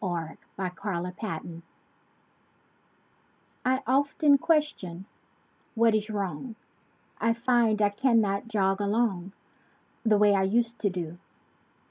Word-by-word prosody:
NOT 170 -4 -3 0.2
LIKE 180 -2 -5
I 200 -5 -1
USED 180 +1 -6
TO 195 -8 -3
DO 165 -1 -9 2.0
I 260 +2 +1
often 280 +2 +3
question—"What 230 - -2
is 215 0 0
wrong?" 205 - -4 0.6
I 230 0 +2
find 235 -2 +2
I 205 - +4
cannot 215 -2 +1
jog 195 -3 +1
along 200 -3 0 0.7
The 220 -3 +4
way 205 0 +5
I 195 - +3
used 230 +4 0
to 205 - +1
do. 175 -2 -5
205 Hz, 115 wpm, -27 LUFS, 185-235 Hz, 2.0 s, way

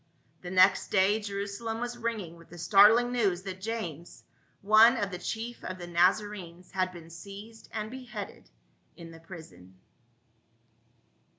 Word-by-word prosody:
The 180 - -7
next 185 +1 +4
day 200 +2 +3
Jerusalem 205 +2 -4
was 245 0 -3
ringing 225 -8 -4
with 165 0 -17
the 175 - -11
start 205 +5 +7
ling 245 +1 +1
news 200 -7 +1
that 190 -1 -7
James, 180 -7 -5 0.4
one 220 +4 +7
of 200 -2 -2
the 180 - -5
chief 225 +5 -5
of 185 - -5
the 175 - -7
Naza 175 +4 +3
renes, 180 -4 -10
had 185 -1 0
been 170 -2 -12
seized 200 +6 -11
and 215 0 -4
beheaded 240 -6 -8 0.5
in 165 -1 -10
the 165 - -12
prison. 95 - -13
195 Hz, 155 wpm, -29 LUFS, 175-220 Hz, 0.5 s, start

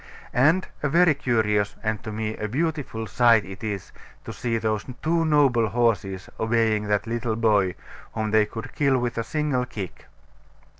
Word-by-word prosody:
And 155 +9 +3
a 145 - 0
very 170 +2 +5
curious, 110 -7 0
and, 110 -1 -1
to 110 - -5
me, 110 0 -3
a 110 - -4
beautiful 140 -3 -2
sight 115 +1 +4
it 95 +3 -10
is, 100 -4 -4 0.3
to - - -6
see 115 -2 -2
those 110 -2 -1 0.2
two 165 +1 +2
noble 135 -7 +3
horses 105 -5 0
obeying 110 -2 +1
that 105 0 +1
little 115 0 -2
boy, 105 -5 +2 0.4
whom 110 -1 -2
they 110 -1 +4
could 115 +4 -8
kill 140 -3 +2
with 120 -2 -2
a - - 0
single 135 -1 -1
kick. 95 -10 -7
115 Hz, 165 wpm, -24 LUFS, 105-130 Hz, 0.4 s, very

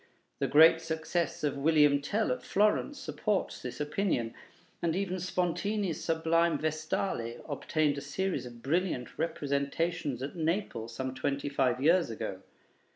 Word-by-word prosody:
The - - +1
great 160 +2 +7
success 165 +1 -2
of 140 -2 -1
'Guillaume 150 -2 +5
Tell' 210 +7 0
at 125 - -2
Florence 215 +8 +1
supports 210 -7 -2
this 125 - -6
opinion, 150 - -1 0.5
and 170 -1 +1
even 185 -1 -1
Spontini's 180 +1 -1
sublime 165 +1 +2
'Vestale' 155 -5 -2
obtained 150 0 0
a - - -8
series 160 +1 -2
of 120 -1 -12
brilliant 160 -4 -1
representations 145 -2 -1
at 140 - -5
Naples 165 - -2
some 130 -1 -3
twenty 140 +2 -2
five 130 -3 +1
years 170 +1 +4
ago. 100 -4 -5
160 Hz, 135 wpm, -30 LUFS, 140-175 Hz, 0.5 s, great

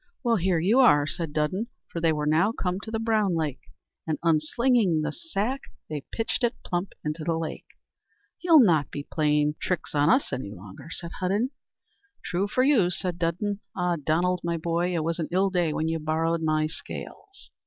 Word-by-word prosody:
"Well, 235 -2 +3
here 180 -1 +1
you 200 +10 +3
are," 145 - +6
said 165 +1 -2
Dudden, 155 +9 -1 0.2
for 170 - -4
they 165 -1 +3
were 150 -1 -1
now 160 +8 +3
come 185 -5 -2
to 220 - -9
the 225 - -1
Brown 215 -5 +1
Lake, 150 -5 -2 0.5
and, 155 - 0
unslinging 170 +3 +2
the - - -1
sack, 270 -6 -3 0.3
they 150 -3 -5
pitched 225 +2 -2
it 240 0 +2
plump 175 +2 -2
into 155 +1 -3
the 165 0 0
lake. 165 -1 -5 0.7
"You'll 330 -4 +7
not 160 -8 +3
be 145 - -5
playing 150 -1 +1
your - - -3
tricks 180 - -2
on 145 +1 +3
us 260 +3 +3
any 125 -5 -3
longer," 100 - -11
said 170 0 -6
Hudden. 205 +8 0 0.7
"True 185 +3 0
for 255 +5 +1
you," 255 -10 +4
said 180 0 -2
Dudden. 185 +5 -1 0.2
"Ah, 180 -1 +1
Donald, 170 +4 0
my 170 0 -1
boy, 170 +2 0
it 160 - 0
was 165 +2 -2
an 160 - -1
ill 190 +2 +2
day 175 -4 +1
when 155 +1 -1
you 160 0 -1
borrowed 160 +2 0
my 155 -1 +1
scales." 395 - -9
170 Hz, 195 wpm, -26 LUFS, 155-205 Hz, 0.7 s, You'll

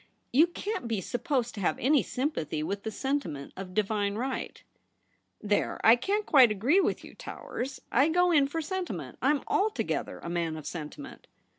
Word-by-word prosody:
You 310 +7 +6
can't 395 - -4
be 225 -3 -1
supposed 245 - -1
to 205 - -6
have 180 - +1
any 280 +3 +3
sympathy 165 - -2
with 200 +5 -3
the 220 - -4
sentiment 210 - -3
of 185 -1 -8
divine 205 -1 0
right.' 260 +4 -4 0.4
' - - -42
There 205 - +1
I 225 - +8
can't 405 - -1
quite 260 -5 +7
agree 235 - +3
with - - 0
you. - - -11
Towers. 260 +1 -6
I 270 +6 +4
go 355 +2 +3
in 290 -4 +5
for 325 +4 -3
sentiment; 375 +2 -4
I - - +3
am 295 -1 +2
alto 425 +2 +1
gether - - -3
a - - -9
man 170 -2 -1
of 155 - -9
sentiment.' 175 - -7
250 Hz, 185 wpm, -29 LUFS, 200-300 Hz, 0.4 s, I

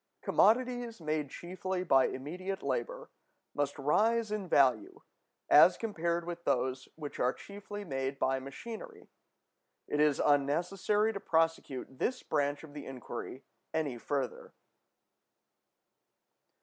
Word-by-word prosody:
(343) - - -2 0.4
Commodities 240 -3 -6
made 155 -3 -2
chiefly 185 +3 -4
by 135 -6 +5
immediate 185 +8 -5
labor - - -3 0.4
must 145 -1 -1
rise 215 +10 +2
in 205 -4 -3
value, 320 - +3 0.5
as - - +7
compared 170 -6 -1
with 170 0 -6
those 130 -1 0
which 150 -3 -7
are 125 - +3
chiefly 205 +3 -8
made 135 -3 -2
by 135 0 +1
machinery. 140 - -9 0.8
It 150 - -1
is 150 -2 +4
unnecessary 175 +9 +2
to 200 - -4
prosecute 160 -7 0
this 255 +1 -1
branch 145 0 0
of 150 -2 -12
the 145 -1 -8
inquiry 130 0 -7 0.3
any 145 -7 -1
further. 135 0 -3
160 Hz, 120 wpm, -32 LUFS, 140-200 Hz, 0.8 s, as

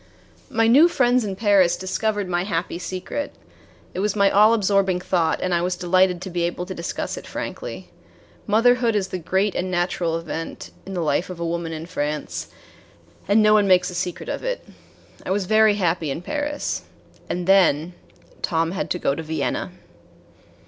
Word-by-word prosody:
My 225 0 +2
new 275 +9 +7
friends 250 -6 +2
in 200 -2 -3
Paris 195 -4 +3
discovered 205 +1 -1
my 175 0 0
happy 175 -2 -2
secret. 185 +10 -5 0.6
It - - -4
was 205 +1 0
my 200 -1 +4
all 215 +3 +6
absorbing 195 -3 +2
thought, 170 -3 0
and 185 - 0
I 170 - +2
was 180 +1 -1
delighted 180 0 +2
to 190 - -6
be 175 0 -2
able 175 +1 -2
to 185 - -6
discuss 170 -2 -4
it - - -9
frankly. - - -6 0.6
Motherhood 230 +2 +3
is 190 -2 0
the 185 - -4
great 190 +4 0
and 185 - -2
natural 175 -2 0
event 165 0 -6 0.2
in 195 - -5
the 175 - -1
life 150 +4 0
of 180 -2 -7
a 170 - -2
woman 170 0 -3
in 160 0 -5
France, 145 - -3 0.8
and 210 +2 +4
no 215 0 +5
one 210 -2 +4
makes 180 -1 +4
a - - -9
secret 180 0 -4
of - - -4
it. - - -3 0.6
I - - -7
was 195 0 0
very 215 +1 +4
happy 170 -5 0
in 160 +5 -4
Paris. 295 +4 -2 0.5
And 175 0 -2
then 180 -4 +4 0.5
Tom 165 0 0
had 195 - -3
to - - 0
go 140 - 0
to 155 - -4
Vienna. 155 -3 -2
185 Hz, 185 wpm, -22 LUFS, 170-205 Hz, 0.8 s, new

